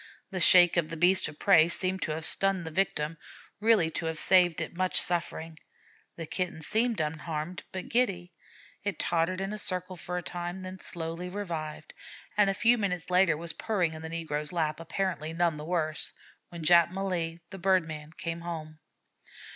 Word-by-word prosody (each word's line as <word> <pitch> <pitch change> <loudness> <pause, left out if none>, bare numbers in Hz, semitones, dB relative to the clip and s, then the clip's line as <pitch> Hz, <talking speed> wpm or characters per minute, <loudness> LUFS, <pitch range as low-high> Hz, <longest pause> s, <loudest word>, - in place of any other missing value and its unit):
The 185 - -3
shake 175 -1 +7
of 165 -2 +1
the 165 - -5
beast 180 +3 +4
of 155 -1 -10
prey 170 -5 +5
seemed 185 +2 +1
to 155 - -2
have 160 +1 -4
stunned 195 0 +2
the 160 - -5
victim, 155 -3 -1 0.4
really 210 -7 +3
to 165 - -3
have 160 -1 -3
saved 175 -1 +5
it - - -5
much 185 +1 +3
suffering. 165 -2 -1 0.6
The 165 - -6
Kitten 170 -1 -3
seemed 225 +4 +1
unharmed, 155 +2 -3
but 185 -1 -6
giddy. 195 -8 0 0.5
It 205 -1 -2
tottered 170 +2 0
in 195 +2 -3
a 215 - -4
circle 185 -1 -1
for 180 +1 -4
a 180 - -4
time, 175 +2 -5
then 185 0 -8
slowly 170 +1 -6
revived, 165 -6 -6 0.4
and 205 -1 +4
a 195 - 0
few 235 +4 +3
minutes 180 -4 -2
later 180 -4 +4
was 165 0 -2
purring 180 -7 -1
in 155 - -8
the 160 - -6
negro's 150 -2 -3
lap, 160 -3 -1
apparently 165 -1 -3
none 170 -2 +1
the 150 - -7
worse, 155 -2 0 0.4
when 170 -2 -8
Jap 170 +1 +6
Malee, 175 -3 -3
the 195 - -8
bird 185 -2 +2
man, 155 -1 -8
came 165 0 -4
home. 155 -2 -7
175 Hz, 185 wpm, -29 LUFS, 160-185 Hz, 0.6 s, shake